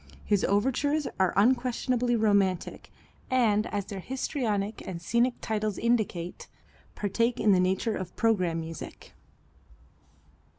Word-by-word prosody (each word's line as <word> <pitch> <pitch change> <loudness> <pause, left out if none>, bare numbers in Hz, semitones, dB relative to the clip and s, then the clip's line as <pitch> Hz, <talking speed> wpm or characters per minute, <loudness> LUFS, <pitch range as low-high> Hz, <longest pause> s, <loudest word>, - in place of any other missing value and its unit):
His 205 -2 +2
overtures 270 +8 +1
are 185 -2 +3
unquestionably 245 +2 +2
romantic, 200 -5 +1 0.4
and 225 -5 +2
as 205 -2 -3
their 200 -1 -6
histrionic 220 -3 -2
and 180 -3 -5
scenic 235 +7 +1
titles 215 -2 -2
indicate, 215 -7 -1 0.5
partake 230 +4 0
of 215 - +4
the 185 - +5
nature 190 +4 +1
of 185 -1 -6
programme 185 -7 +1
music. 165 0 -9
210 Hz, 115 wpm, -28 LUFS, 190-240 Hz, 0.5 s, the